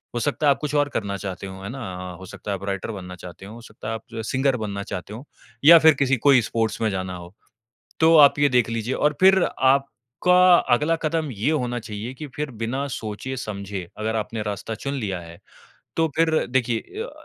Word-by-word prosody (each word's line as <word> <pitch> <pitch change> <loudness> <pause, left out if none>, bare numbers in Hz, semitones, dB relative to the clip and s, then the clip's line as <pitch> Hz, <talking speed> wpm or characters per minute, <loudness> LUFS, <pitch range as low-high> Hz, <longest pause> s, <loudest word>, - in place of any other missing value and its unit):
हो - - 0
सकता 145 +5 -1
है - - +7
आप 135 - 0
कुछ 150 0 -3
और 145 0 +2
करना 100 -6 -3
चाहते 95 0 -6
हों, 95 0 -9
है 100 - -5
ना 130 +3 -7 0.3
अ, - - -10
हो 95 - -11
सकता 100 +2 -7
है - - 0
आप 95 - -13
राइटर 100 +2 -3
बनना 90 -3 -8
चाहते 90 +1 -11
हों, 105 +3 -10
हो 120 - -11
सकता 110 -2 -11
है 110 - -2
आप 110 - -6
जो 115 - -8
है 110 - -3
सिंगर 135 +3 +1
बनना 100 -3 -4
चाहते 95 +1 -6
हों, 115 +4 -8 0.4
या 165 +2 +10
फिर 160 0 +7
किसी 135 -1 +2
कोई 135 -3 +7
स्पोर्ट्स 110 -1 -2
में 110 - +2
जाना 95 -1 -4
हो। 90 0 -11 0.7
तो 165 0 +6
आप 145 -1 +7
ये 145 0 +4
देख 125 -3 +2
लीजिए, 115 +2 -2
और 150 0 +1
फिर 190 0 +6
आपका 140 +7 +3 0.2
अगला 150 +7 +1
कदम 155 -1 -1
ये 110 +6 -1
होना 125 -6 -1
चाहिए 110 +2 -6
कि 150 +3 -7
फिर 150 -1 -3
बिना 130 +5 -2
सोचे-समझे 105 -5 -5
अगर 110 +1 -1
आपने 110 0 -3
रास्ता 105 +1 -4
चुन 140 +5 -4
लिया 100 -9 -3
है, 85 0 -12 0.6
तो 165 0 +2
फिर 160 0 +2
देखिए 120 -2 0 0.2
य - - -1
अ, - - -7
115 Hz, 230 wpm, -23 LUFS, 100-140 Hz, 0.7 s, या